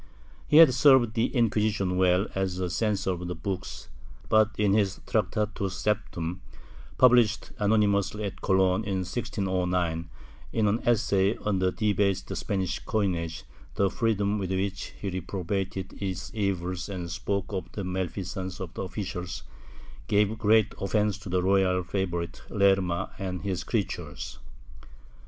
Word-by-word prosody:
He 150 - +5
had 160 -5 +9
served 130 -3 +5
the 115 +1 +2
Inquisition 105 -5 +1
well 90 +1 +3
as 95 -2 -1
a 90 -2 -2
censor 100 -2 0
of 90 -2 -5
books, 95 -3 -4 0.4
but 110 0 +5
in 105 -2 +3
his 100 -2 +1
Tractatus 105 -3 -1
septem, 95 -5 -2 0.6
published 120 -4 +4
anonymously 105 -1 +2
at 100 -2 -5
Cologne, 95 +1 +2
in 95 -3 -2
1609, 90 -5 -1 0.4
in 110 -2 +2
an 105 +3 +2
essay 110 -3 +2
on 100 -3 +1
the 95 0 +2
debased 100 -3 0
Spanish 95 -4 -2
coinage, 85 -6 -2 0.3
the 100 -1 +2
freedom 105 -2 0
with 95 -2 -3
which 95 +1 -2
he 100 - -3
reprobated 95 +1 -3
its 95 0 -4
evils 95 -3 -2
and 90 -3 -5
spoke 100 +4 -2
of 90 -3 -4
the 100 - -4
malfeasance 95 0 -4
of 90 -3 -7
officials 95 -2 -5 0.6
gave 105 +1 +2
great 110 0 +4
offence 105 +1 +1
to 100 - -9
the 90 0 +1
royal 95 -1 +3
favorite 85 -2 -3
Lerma 95 -3 +2
and 90 -2 -4
his 95 -3 -2
creatures. - - -3
95 Hz, 135 wpm, -27 LUFS, 90-105 Hz, 0.6 s, had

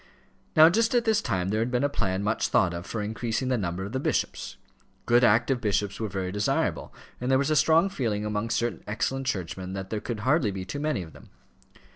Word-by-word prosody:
Now 155 0 +9
just 225 +7 +2
at 240 -1 +2
this 220 -1 +3
time 95 -1 -1
there 110 +2 0
had 115 - 0
been 125 +1 0
a - - +4
plan 95 -8 -2
much 105 +2 0
thought 90 -2 +2
of 85 +1 -6
for 110 -2 -3
increasing 115 +4 -2
the 130 - +2
number 90 0 -3
of 100 - -7
the 130 - -2
bishops. - - -2 0.5
Good 120 +1 +4
active 120 +3 +3
bishops 105 -2 -1
were 110 - -2
very 95 -1 -3
desirable, 105 +2 -1 0.3
and 125 - -3
there 130 - +4
was 140 +3 0
a - - +3
strong 160 +4 +4
feeling 115 - -2
among 105 +2 -2
certain 120 0 -1
excellent 130 +5 -2
churchmen 95 -2 -3
that 95 -1 -6
there 110 -1 -2
could 115 -3 -4
hardly 130 -1 +2
be 95 -1 -5
too 145 - -5
many 150 -10 -1
of 80 - -13
them. - - -16
115 Hz, 225 wpm, -27 LUFS, 100-135 Hz, 0.5 s, Now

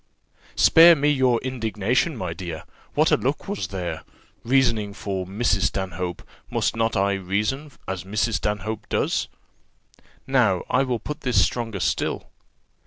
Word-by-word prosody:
"Spare 170 +1 +8
me 145 0 +1
your 130 -4 +3
indignation, 125 - -1
my 90 -5 -3
dear! 85 -2 -6 0.3
What - - +3
a - - +5
look - - -2
was 95 - -3
there! 85 -4 -4 0.4
Reasoning 115 -5 +2
for 95 -4 -4
Mrs. 105 +6 +1
Stanhope, 90 -2 -4 0.3
must - - 0
not 115 -1 0
I 100 +1 +2
reason 105 +10 -2 0.2
as 95 -2 -4
Mrs. 105 +3 0
Stanhope 105 +1 -3
does? - - 0 1.0
Now 120 -9 +2
I 125 - +3
will 130 -3 0
put 150 +6 -7
this 125 -2 +2
stronger 115 -5 -3
still. - - -2
105 Hz, 140 wpm, -23 LUFS, 95-125 Hz, 1.0 s, Spare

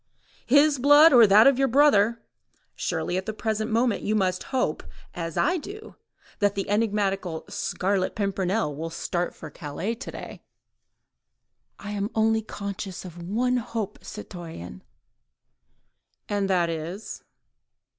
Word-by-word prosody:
"His 285 +1 +5
blood, 290 +4 +7
or 235 -3 +8
that 205 +3 +7
of 275 -1 +5
your 270 - +3
brother. 235 -4 +4 0.5
Surely 180 - -2
at 190 - -4
the 220 - -2
present 220 0 -2
moment 230 0 +1
you 215 - 0
must 185 -3 0
hope, 255 - 0 0.3
as 165 -2 -5
I 360 - +2
do, 410 +7 -9 0.4
that 205 -1 +2
the 195 - -2
enigmatical 200 -5 0
Scarlet 190 0 -1
Pimpernel 195 -4 -1
will 165 +3 -4
start 175 +1 -3
for 155 - -10
Calais 165 +8 -4
to 235 - -8
day—" - - -9 1.4
"I 205 - -7
am 205 0 -2
only 220 0 +2
conscious 200 -3 -6
of 175 -1 -9
one 250 +4 +1
hope, 230 -4 -4
citoyen." 165 - -9 1.5
"And 200 -1 -1
that 175 -3 +2
is?" 165 +6 -6
205 Hz, 135 wpm, -25 LUFS, 185-230 Hz, 1.5 s, or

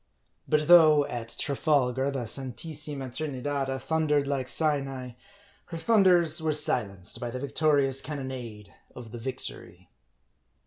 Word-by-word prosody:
But 150 0 +1
though, 155 -4 +7
at 115 -4 -5
Trafalgar, 135 -2 +1
the 135 -4 -3
Santissima 135 +2 -5
Trinidada 140 -1 -3
thundered 150 0 0
like 135 -2 -2
Sinai, 135 -5 0 0.5
her 165 - -7
thunders 175 -4 +3
were 160 -1 0
silenced 105 -10 0
by 120 -1 -4
the 125 - -5
victorious 140 -1 +1
cannonade 130 -8 -7 0.2
of 120 -3 -10
the 120 - -7
Victory. 105 -8 -8
140 Hz, 120 wpm, -27 LUFS, 125-150 Hz, 0.5 s, though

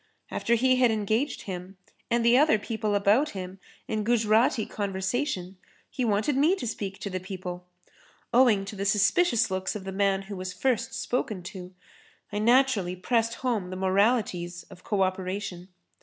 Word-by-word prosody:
After 235 - +1
he 255 +2 +3
had 250 -2 +4
engaged 220 +5 -1
him 185 0 -7 0.3
and 235 0 +1
the 235 +1 +6
other 280 -4 +5
people 215 -1 -2
about 210 +9 +3
him 185 +1 -7 0.3
in 215 -1 -1
Gujrati 225 0 +2
conversation, 195 -1 -3 0.3
he 255 - -2
wanted 220 +5 +1
me 305 +7 +4
to 380 - -6
speak 200 -4 -4
to 200 - -4
the 185 - -2
people. 180 -1 -7 0.7
Owing 230 -5 +4
to 200 - -7
the 200 - -3
suspicious 220 - +3
looks 190 +2 -2
of 205 - -5
the 190 - -5
man 195 0 +1
who 200 +1 -7
was 185 0 -5
first 240 +5 -1
spoken 215 -6 -2
to, 185 -1 -9 0.6
I 205 - -1
naturally 230 -5 +3
pressed 230 +4 0
home 215 -8 0
the 185 - -5
moralities 190 -2 +1
of 180 -1 -14
co 200 -3 +1
operation. 185 -1 -3
205 Hz, 165 wpm, -27 LUFS, 190-235 Hz, 0.7 s, the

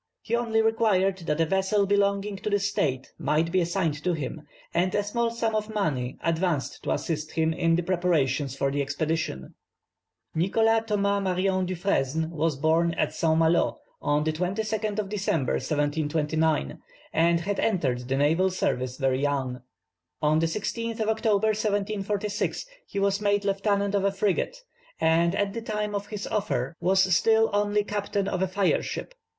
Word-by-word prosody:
He 235 - 0
only 225 -2 +1
required 200 -4 +2
that 150 +1 0
a - - +4
vessel 190 +3 +1
belonging 200 0 +1
to 210 - -3
the 205 - +3
state 150 -10 -1
might 160 +2 +1
be 185 0 +3
assigned 170 -4 -1
to 180 - +1
him, 150 0 -4 0.3
and 180 +2 +1
a 205 - +2
small 230 +3 0
sum 230 -1 -1
of 215 0 -1
money 140 -12 -1
advanced 165 -2 -1
to - - -2
assist 155 -2 -2
him 160 0 +1
in 165 0 +2
the 175 - 0
preparations 155 -7 +1
for 140 0 0
the 145 +1 0
expedition. 145 - -2 0.8
Nicholas 225 +6 +2
Thomas 200 -1 +1
Marion 185 0 +1
Dufresne 160 -4 0
was 160 -2 0
born 165 +3 +2
at - - 0
St. 160 -2 +1
Malo 165 +1 +2 0.2
on 145 +1 +1
the 155 0 0
22nd 210 +5 -2
of 210 -2 -1
December, 190 -9 0
1729, 150 - 0 0.3
and 170 +1 +3
had 200 +3 -2
entered 130 - 0
the 135 +1 0
naval 160 +7 +3
service 130 -8 -1
very 135 -1 +1
young. 135 -3 -1 0.6
On 155 +1 +3
the 165 - +2
16th 230 +5 -3
of 220 0 0
October, 220 -1 +2
1746, 210 - -1 0.2
he - - -7
was 200 +1 +1
made 205 -1 +1
lieutenant 200 0 +1
of 200 -1 +1
a 200 - +2
frigate, 200 - 0 0.4
and 165 +2 +3
at 200 -1 0
the 230 - -4
time 210 -2 -3
of 205 0 -3
his 210 -1 -5
offer 170 - -2
was 190 +2 +3
still 225 +3 +3
only 205 0 +2
captain 205 -1 -2
of 185 - -2
a 190 - +2
fire 190 +1 +1
ship. - - -5
185 Hz, 165 wpm, -26 LUFS, 160-205 Hz, 0.8 s, a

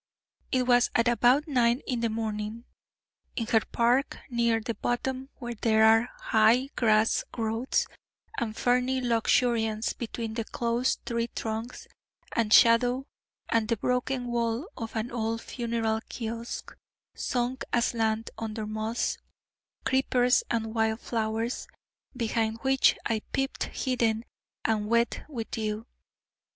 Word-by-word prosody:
It 255 -1 +2
was 245 -1 +4
at 230 0 +3
about 245 +5 +4
nine 245 -2 +2
in 250 -3 -1
the 230 0 0
morning, 220 +1 -3 0.7
in 230 - -1
her 225 -1 +3
park, 245 +4 +2
near 235 -1 +2
the 230 +1 -3
bottom 260 +4 -2
where 240 -2 -5
there 220 -1 +3
are 225 +2 +5
high 230 +5 +3
grass 220 -1 +3
growths 225 +2 0 0.5
and 220 -1 -3
ferny 250 +1 +2
luxuriance 230 -2 +1
between 230 -1 -5
the 230 0 -2
close 235 +3 0
tree 235 -1 -1
trunks, 225 +1 -5 0.5
and 225 -2 +1
shadow, 245 +4 +5 0.4
and 225 -1 +2
the 230 0 0
broken 250 +3 -1
wall 235 +2 -1
of 225 -2 -6
an 220 +2 -2
old 225 -1 -2
funeral 230 -2 -1
kiosk 230 0 -5 0.4
sunk 250 +1 -2
aslant 225 -2 0
under 220 -1 -4
moss, 215 +2 -2 0.7
creepers, 255 -1 +3
and 225 -1 -1
wild 220 0 +1
flowers, 225 +1 -2 0.5
behind 225 -1 0
which 265 0 +4
I 220 -2 0
peeped 270 0 -1
hidden 235 -3 -1 0.4
and 215 -2 +1
wet 235 +1 +1
with 235 -6 -5
dew. 215 0 -3
230 Hz, 125 wpm, -28 LUFS, 220-245 Hz, 0.7 s, are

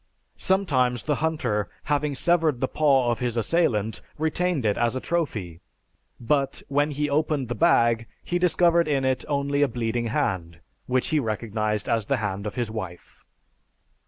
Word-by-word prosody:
Sometimes 135 -11 +1
the 150 -2 0
hunter, 125 - 0
having 145 -1 0
severed 160 -3 +2
the 130 - 0
paw 135 -6 +3
of 120 - -2
his 120 -2 -2
assailant, 110 -5 +1 0.2
retained 160 -2 0
it 105 -1 +2
as 120 +1 0
a - - -1
trophy; 110 - -3 0.6
but, 135 +3 0
when 145 +2 +2
he 150 0 -1
opened 145 -3 0
his - - -4
bag, 115 -9 +3 0.2
he 175 - -1
discovered 170 -1 +3
in 140 -3 +1
it 130 -1 0
only 140 -1 0
a 145 - +5
bleeding 120 -1 -2
hand, 95 - -2 0.3
which 130 0 +1
he 155 - +2
recognized 110 -3 -2
as 115 -3 0
the 135 - +1
hand 100 -2 -3
of - - -6
his 120 -3 -2
wife. 95 -6 -8
130 Hz, 160 wpm, -25 LUFS, 115-150 Hz, 0.6 s, a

